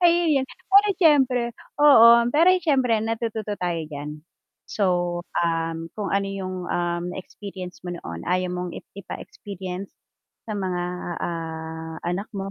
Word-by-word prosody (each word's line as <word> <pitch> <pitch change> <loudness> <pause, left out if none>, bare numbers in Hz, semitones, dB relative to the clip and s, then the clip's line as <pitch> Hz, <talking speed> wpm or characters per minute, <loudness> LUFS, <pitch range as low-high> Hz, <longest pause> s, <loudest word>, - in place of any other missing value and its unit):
Ayun 335 -5 +4
yun, - - -5 0.2
pero 400 +2 +6
siyempre 270 -7 +4 0.4
oo, 280 -6 +9 0.3
pero 330 +4 +6
siyempre 260 -9 +2
natututo 220 -2 -2
tayo 175 -2 -1
diyan. 150 0 -7 0.4
So, 175 -3 0 0.2
um, 165 -1 -1
kung 205 -3 -3
ano 200 0 +1
yung, 190 -1 -4
um, 175 0 -1
experience 190 -1 -8
mo 175 - -3
noon, 85 - -7
ayaw 180 0 +1
mong 180 0 -3
i - - -8 0.2
ipa-experience 195 -1 -7 0.6
sa - - -2
mga, 185 -2 -1 0.4
ah, 160 -1 -5
anak 180 +4 -2
mo 195 0 -4
185 Hz, 135 wpm, -24 LUFS, 175-225 Hz, 0.6 s, oo